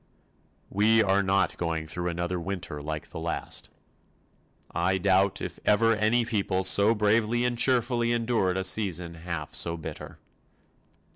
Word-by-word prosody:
We 110 +3 +4
are 100 0 +2
not 95 0 +1
going 80 -2 -2
through 90 +3 -4
another 85 +1 -2
winter 90 -4 -5
like 75 +2 -6
the - - -6
last. 85 +1 -4 1.0
I 90 +3 +1
doubt 95 +1 +2
if - - -6
ever 115 +2 +3
any 110 +3 +2
people 95 -4 -1
so 100 +4 +4
bravely 110 +3 +2
and 125 -1 0
cheerfully 120 -1 +1
endured 115 -6 +1
a 95 - -1
season 90 -4 -1
half 85 -2 -6
so 85 0 0
bitter. 80 - -8
95 Hz, 140 wpm, -27 LUFS, 85-110 Hz, 1.0 s, We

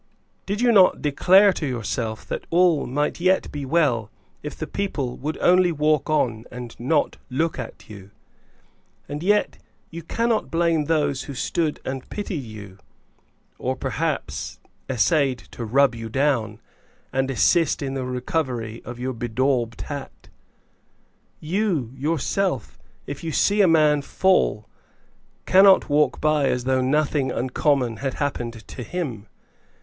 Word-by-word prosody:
Did 205 +3 -2
you 245 -1 +4
not 190 -5 +5
declare 190 +7 +5
to 155 - -3
yourself 115 -2 -3
that - - -5
all 170 -3 +3
might 145 +6 -1
yet 185 +2 +2
be 145 -2 -5
well, 130 -9 +1 0.3
if - - -6
the - - -5
people 145 -11 -3
would 150 +4 -4
only 180 0 +4
walk 155 -2 +1
on 120 -7 0
and 125 -1 -8
not 145 +5 0
look 155 +4 -1
at 125 - -8
you? 100 -2 -11 1.0
And 145 +1 -5
yet 205 +4 +1 0.3
you 170 0 -7
cannot 230 +6 -1
blame 165 -2 +1
those 145 -4 0
who 140 - -7
stood 155 +4 -1
and 130 -1 -5
pitied 200 -7 -4
you; 105 -5 -11 0.8
or, 130 +1 -1
perhaps, 145 +4 -3 0.3
essayed 135 +1 +2
to 120 - -6
rub 130 +3 +3
you 115 -1 -7
down, 115 -5 0 0.5
and 135 0 0
assist 155 +7 +2
you - - -2
in - - -5
the 135 -1 -3
recovery 125 -3 -3
of 120 0 -8
your 130 +1 -3
bedaubed 120 0 -1
hat. 140 -2 -8 1.1
You, 165 - -1
yourself, 155 - -1 0.3
if 145 +2 -7
you 165 - -3
see 205 +7 +3
a 195 - +5
man 155 -3 +4
fall, 140 - +1 0.8
cannot 190 -2 +6
walk 145 -3 +2
by 155 -2 +2
as 125 - -1
though 130 0 +1
nothing 140 0 +1
uncommon 125 -1 0
had 135 -1 -3
happened 120 -5 -4
to - - -8
him. 125 - -5
140 Hz, 145 wpm, -23 LUFS, 125-165 Hz, 1.1 s, cannot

